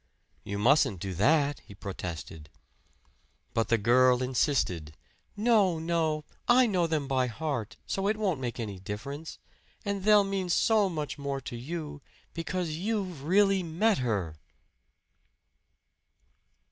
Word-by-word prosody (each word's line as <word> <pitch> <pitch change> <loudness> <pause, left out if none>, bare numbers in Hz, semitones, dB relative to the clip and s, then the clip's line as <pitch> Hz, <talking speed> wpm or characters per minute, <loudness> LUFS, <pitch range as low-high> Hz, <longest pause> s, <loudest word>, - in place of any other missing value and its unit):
"You 100 - -4
mustn't 125 - +3
do 95 +1 -4
that!" 145 - +2
he 100 - -15
protested. 85 -6 -7 1.0
But 115 - +1
the 115 - +3
girl 125 +3 +4
insisted. 115 - 0 0.4
"No, 210 -6 +3
no! 160 -2 -1 0.2
I 250 +1 +6
know 185 -7 +1
them 155 -4 -1
by 130 -2 +1
heart, 125 -3 -4
so 195 0 -1
it 215 +1 +1
won't 190 -9 0
make 120 -1 -4
any 105 -5 -5
difference. 125 - -6 0.5
And 200 -1 -2
they'll 210 0 +6
mean 195 -2 -2
so 210 +3 +3
much 150 -3 -4
more 140 -1 -3
to 125 - -7
you, 150 +3 -6 0.3
because 170 0 -3
you've 185 -6 -3
really 195 +2 +4
met 180 +5 +1
her!" 100 -11 -2
150 Hz, 130 wpm, -29 LUFS, 115-185 Hz, 1.0 s, I